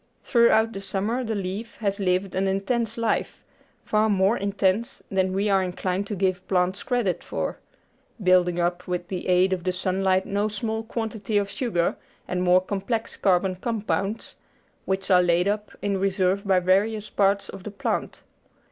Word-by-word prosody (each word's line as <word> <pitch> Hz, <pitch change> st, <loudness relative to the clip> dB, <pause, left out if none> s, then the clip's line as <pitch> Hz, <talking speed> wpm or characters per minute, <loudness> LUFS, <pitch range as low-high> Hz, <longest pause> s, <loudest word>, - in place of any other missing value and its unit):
Throughout 230 Hz, -2 st, +4 dB
the 195 Hz, -, -6 dB
summer 205 Hz, +6 st, -1 dB
the 220 Hz, -2 st, -2 dB
leaf 200 Hz, +4 st, -4 dB
has 200 Hz, -2 st, -2 dB
lived 185 Hz, 0 st, 0 dB
an 190 Hz, +1 st, 0 dB
intense 205 Hz, +4 st, -1 dB
life, 230 Hz, -1 st, -1 dB, 0.4 s
far 215 Hz, +1 st, +2 dB
more 195 Hz, +2 st, +3 dB
intense 200 Hz, +1 st, 0 dB
than 190 Hz, -1 st, +1 dB
we 195 Hz, +2 st, 0 dB
are 195 Hz, -2 st, +3 dB
inclined 185 Hz, +1 st, -2 dB
to 210 Hz, -, -3 dB
give 185 Hz, -1 st, -1 dB
plants 185 Hz, +1 st, +1 dB
credit 240 Hz, -8 st, -1 dB
for, -, -, -3 dB, 0.6 s
building 180 Hz, -1 st, +4 dB
up 175 Hz, +1 st, -1 dB
with 180 Hz, 0 st, -3 dB
the 185 Hz, -2 st, -4 dB
aid 185 Hz, +1 st, +4 dB
of 180 Hz, -2 st, -3 dB
the 185 Hz, -, +1 dB
sunlight 185 Hz, +1 st, +1 dB
no 205 Hz, +1 st, 0 dB
small 220 Hz, +1 st, -3 dB
quantity 220 Hz, -2 st, -3 dB
of 200 Hz, 0 st, 0 dB
sugar 200 Hz, -7 st, 0 dB, 0.3 s
and 180 Hz, 0 st, -1 dB
more 180 Hz, 0 st, +5 dB
complex 200 Hz, +4 st, -3 dB
carbon 185 Hz, 0 st, +2 dB
compounds, 215 Hz, 0 st, -2 dB, 0.5 s
which 190 Hz, 0 st, -1 dB
are 180 Hz, -1 st, +7 dB
laid 175 Hz, +1 st, +2 dB
up 210 Hz, +1 st, -1 dB
in 200 Hz, -1 st, 0 dB
reserve 195 Hz, +1 st, 0 dB
in 185 Hz, -2 st, +4 dB
various 210 Hz, +3 st, +2 dB
parts 200 Hz, 0 st, +2 dB
of -, -, -9 dB
the 210 Hz, -, -5 dB
plant. 200 Hz, -, -3 dB
195 Hz, 165 wpm, -25 LUFS, 185-210 Hz, 0.6 s, are